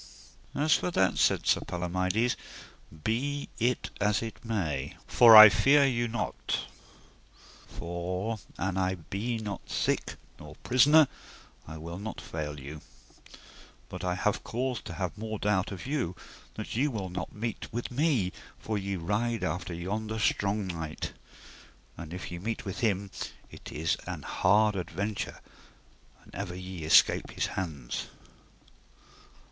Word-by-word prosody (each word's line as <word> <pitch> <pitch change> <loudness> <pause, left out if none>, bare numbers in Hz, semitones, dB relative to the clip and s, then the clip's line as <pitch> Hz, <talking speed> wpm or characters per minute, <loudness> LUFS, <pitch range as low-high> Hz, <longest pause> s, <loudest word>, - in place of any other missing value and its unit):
As 150 +2 +3
for - - +1
that, 95 - +2
said - - +3
Sir - - +4
Palomides, 95 +7 0 0.7
be 140 +6 -1
it 120 +2 0
as 105 +2 +2
it 115 - -7
be - - -12
may, 75 -11 -2
for 115 -2 +8
I 110 0 +14
fear 140 +6 +5
you 120 -3 +1
not, 120 +1 -2 1.0
for 90 +6 -4 0.2
an 95 0 -1
I 95 0 +1
be 100 +7 -3
not 105 -3 -6
sick - - 0 0.2
nor 75 0 -11
prisoner, 145 +4 +6 0.6
I 80 +1 -7
will 85 +3 -7
not 110 +2 -6
fail 75 -2 -5
you; 70 +3 -8 1.1
but - - -7
I 90 0 0
have 105 +2 0
cause 125 0 -2
to - - -6
have 90 0 -3
more 110 0 -4
doubt 100 -2 +1
of 95 -3 -7
you 130 - -1 0.4
that - - -5
ye 135 +6 +2
will 105 -9 -3
not 90 0 -4
meet 115 +1 -4
with 120 +3 -4
me, 125 - +1 0.3
for 110 -2 -3
ye 100 0 -3
ride 105 +5 -1
after 90 0 -2
yonder 105 +6 -3
strong 105 -1 +1
knight. 80 -4 -5 0.8
And 85 -2 -8
if 90 0 -6
ye 85 - -5
meet 110 +5 -4
with 95 - -4
him 100 -3 0 0.4
it - - -10
is 80 +1 0
an - - -5
hard 105 +2 +3
adventure 100 +3 -3 0.8
an - - -18
ever 90 - -4
ye 90 -3 -6
escape 80 - +5
his - - -1
hands. 75 -10 -4
100 Hz, 145 wpm, -29 LUFS, 90-115 Hz, 1.1 s, I